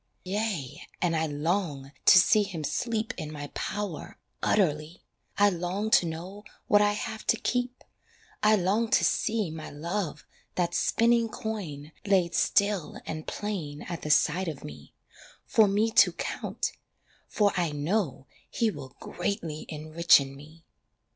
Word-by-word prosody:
Yea 190 - -3 0.2
and 170 -2 +1
I 160 0 +1
long 150 -2 -2
to - - +9
see 210 +4 +6
him 185 -6 -4
sleep 225 - -2
In 155 -1 -5
my 145 -1 -7
power 200 -5 -4 0.2
utterly, 155 -4 0 0.3
I 205 0 +5
long 185 +5 -2
to 175 - +5
know 180 +6 -7 0.2
what 205 0 +5
I 205 0 +3
have 220 +1 -5
to 230 - +4
keep, 245 +2 -2 0.6
I 215 0 +5
long 210 +4 +1
to - - +3
see 215 -6 0
My 160 0 -7
love, 170 +2 -4 0.3
that 175 -1 0
spinning 230 +3 +2
coin, 180 -11 -5
laid 190 -4 +2
still 200 -5 +1
And 155 0 -6
plain 170 -9 -4
at 170 -2 -6
the 150 - -5
side 165 +4 +3
of 155 -4 -5
me, 75 0 -11 0.5
For 220 -2 +4
me 210 +3 +1
to - - +5
count - - -3 0.6
for 205 -2 +2
I 175 -4 0
know 150 -1 -1 0.2
he 230 -2 +1
will 130 -8 -10
Greatly 165 -7 -4
enrichen 155 -3 +3
me. 155 +4 -15
180 Hz, 145 wpm, -28 LUFS, 155-210 Hz, 0.6 s, to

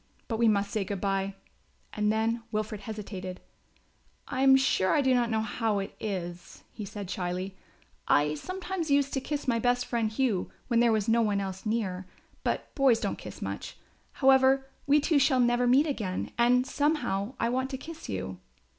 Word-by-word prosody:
But 225 -2 -2
we 235 - +4
must 200 -2 +2
say 215 - 0
good 195 0 -4
bye," 195 0 -1 0.6
and 210 0 +1
then 225 +2 0
Wilfred 215 -1 -3
hesitated, 195 -4 -6 0.9
"I 255 - -2
am 270 0 +7
sure 265 -8 +3
I - - +4
do 260 -1 +3
not 240 -2 +2
know 220 -1 +1
how 220 -1 -1
it 195 0 -4
is," 175 -4 -5
he 215 - -6
said 200 0 -7
shyly, 185 +1 -3 0.5
"I 150 +1 +3
sometimes 370 - -4
used 280 0 +2
to 270 - 0
kiss 290 +1 -4
my 230 -2 +2
best 245 +1 +1
friend, 230 -3 -1
Hugh, 220 -5 0 0.2
when 235 -2 +3
there 235 -1 +4
was 215 -2 +1
no 230 +1 +4
one 205 -3 +1
else 190 +1 -5
near; 190 -5 -2 0.4
but - - -2
boys 265 -5 +4
don't - - -3
kiss - - -8
much. - - -5 0.4
However, 265 0 +4 0.2
we 290 +2 +5
two 295 0 +3
shall 265 -2 +3
never 240 0 +3
meet 265 +5 +5
again 215 - -3
and 245 +1 +4
somehow 270 -8 0
I 230 - +1
want 260 +2 -1
to 265 - -4
kiss 320 +4 -9
you." 95 -2 -4
225 Hz, 185 wpm, -28 LUFS, 195-265 Hz, 0.9 s, am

